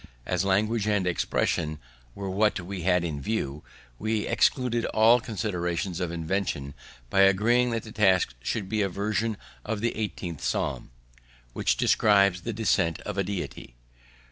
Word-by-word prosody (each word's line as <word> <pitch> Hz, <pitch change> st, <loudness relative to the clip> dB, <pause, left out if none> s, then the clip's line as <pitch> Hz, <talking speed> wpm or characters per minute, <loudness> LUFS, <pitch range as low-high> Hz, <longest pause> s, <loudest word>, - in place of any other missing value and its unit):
As -, -, 0 dB
language 105 Hz, +3 st, +1 dB
and 105 Hz, -3 st, +1 dB
expression 80 Hz, -2 st, 0 dB, 0.4 s
were 100 Hz, -1 st, -5 dB
what 105 Hz, +2 st, +1 dB
we 95 Hz, +1 st, -6 dB
had 90 Hz, 0 st, +2 dB
in 75 Hz, -4 st, -3 dB
view, 75 Hz, -8 st, -2 dB, 0.4 s
we 110 Hz, 0 st, -1 dB
excluded 120 Hz, -3 st, +1 dB
all 115 Hz, +3 st, +5 dB
considerations 90 Hz, -6 st, -2 dB
of 90 Hz, -3 st, -2 dB
invention 80 Hz, -4 st, -2 dB, 0.4 s
by 95 Hz, -, +4 dB
agreeing 110 Hz, +6 st, +4 dB
that 115 Hz, -2 st, -2 dB
the 110 Hz, -, -10 dB
task 95 Hz, -, +3 dB
should 100 Hz, -, -2 dB
be 110 Hz, +1 st, 0 dB
a 100 Hz, -, +1 dB
version 105 Hz, +3 st, -1 dB, 0.3 s
of 110 Hz, -1 st, -3 dB
the 115 Hz, +2 st, -1 dB
eighteenth 90 Hz, -8 st, -4 dB
Psalm, -, -, -2 dB, 0.6 s
which -, -, +1 dB
describes 100 Hz, -4 st, +4 dB
the 115 Hz, -, -3 dB
descent 95 Hz, -7 st, +1 dB
of 105 Hz, -, -5 dB
a -, -, +2 dB
Deity. 90 Hz, -9 st, -6 dB
100 Hz, 150 wpm, -27 LUFS, 90-110 Hz, 0.6 s, all